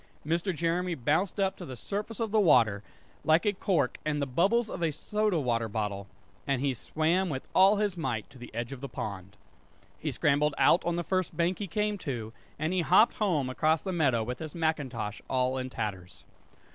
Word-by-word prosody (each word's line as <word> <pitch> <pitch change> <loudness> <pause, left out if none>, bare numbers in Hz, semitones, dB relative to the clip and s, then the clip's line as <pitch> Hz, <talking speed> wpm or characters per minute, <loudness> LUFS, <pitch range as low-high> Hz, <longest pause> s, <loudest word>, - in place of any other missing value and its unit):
Mr. 170 +5 0
Jeremy 170 +1 -1
bounced 160 - 0
up 195 -1 +1
to - - -9
the 130 - -7
surface 205 - -4
of 225 -3 -1
the 220 - +4
water, 120 - +4 0.4
like 160 +4 +4
a 205 - +3
cork 175 -9 0
and 150 -1 -1
the 140 - 0
bubbles 195 - +2
out - - -7
of 175 - -6
a 165 - +2
soda 210 +4 0
water 115 -4 0
bottle; 100 -2 -3 0.4
and 135 -2 +1
he 135 0 +1
swam 165 +9 0
with 135 -3 -4
all 195 +2 +6
his 205 -2 0
might 120 -10 -3
to 130 - -16
the 120 - -9
edge 120 +1 -3
of 135 -2 -7
the 140 - -5
pond. 100 -3 -6 0.6
He - - -2
scrambled 150 +1 +2
out 175 - +5
on 175 0 0
the 175 - -1
first 185 -3 -1
bank 175 +2 +1
he 205 - -3
came 210 +3 -1
to, 115 -8 -5 0.2
and 155 +4 -1
he 185 - +2
hopped 190 - +5
home 170 -11 +1
across 155 +5 +1
the 190 - -3
meadow 135 -9 +2
with 125 +2 -5
his 155 0 -7
macintosh 130 -10 -2
all 130 0 +1
in 130 0 -4
tatters. 95 -7 -5
155 Hz, 210 wpm, -29 LUFS, 125-185 Hz, 0.6 s, all